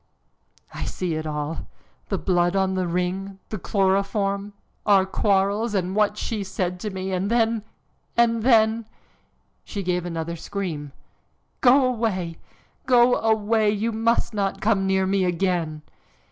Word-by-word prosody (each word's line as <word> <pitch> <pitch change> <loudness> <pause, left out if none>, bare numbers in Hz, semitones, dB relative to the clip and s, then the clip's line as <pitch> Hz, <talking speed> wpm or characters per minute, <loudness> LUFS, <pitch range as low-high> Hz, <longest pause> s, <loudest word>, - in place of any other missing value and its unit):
"I - - -4
see 180 -3 -3
it 155 0 -3
all 150 +1 -4 0.4
the - - 0
blood 175 0 +1
on 190 -1 +2
the 185 -1 -1
ring, 180 +3 -2
the 215 - -4
chloroform, 200 +1 0 0.3
our 195 -2 +4
quarrels, 200 +3 +1
and 185 0 -1
what 210 0 +2
she 215 -1 -3
said 185 -2 -3
to 210 - -3
me, 190 -1 -4
and 185 +2 -1
then, 230 -2 +2 0.5
and 230 -1 +3
then 225 -2 +3 0.4
" - - -43
She 200 - -5
gave 180 -1 0
another 170 -1 -4
scream. 165 -5 -5 0.7
"Go 260 +1 +6
away! 215 -9 -1 0.5
go 245 -1 +5
away! 220 -1 +2
You 215 +2 0
must 230 +1 +1
not 200 -2 -1
come 200 -2 +1
near 190 0 +2
me 195 0 +1
again!" 175 -4 -1
195 Hz, 145 wpm, -24 LUFS, 180-220 Hz, 0.7 s, Go